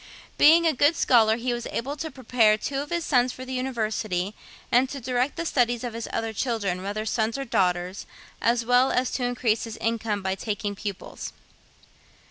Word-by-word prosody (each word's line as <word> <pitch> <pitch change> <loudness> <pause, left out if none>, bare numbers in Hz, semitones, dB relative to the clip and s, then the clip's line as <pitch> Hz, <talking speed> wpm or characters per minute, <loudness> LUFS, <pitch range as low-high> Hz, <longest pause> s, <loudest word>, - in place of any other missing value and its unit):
Being 330 +3 +7
a 320 - +4
good 290 +5 +3
scholar 225 -7 +4
he 245 +1 -1
was 240 -1 -4
able 275 +5 -3
to 320 +2 -4
prepare 235 -5 +2
two 275 +5 -3
of 290 - -7
his 340 -2 -1
sons 250 -2 +3
for 255 - -8
the 260 - -6
University, 215 -7 -2 0.4
and 250 +2 +4
to 275 - -5
direct 250 +2 -1
the 335 - -3
studies 245 -5 +1
of 240 -2 -4
his 230 0 -5
other 225 -1 -2
children, 205 -6 -1
whether 205 +3 -3
sons 220 +2 0
or 275 - -4
daughters, 180 -3 0 0.3
as 235 0 +2
well 245 +2 +4
as 250 0 +1
to 255 - -2
increase 245 -3 0
his 225 -1 -7
income 225 -3 -1
by 190 0 0
taking 205 +1 -3
pupils. 200 -1 -6
235 Hz, 190 wpm, -25 LUFS, 215-255 Hz, 0.4 s, Being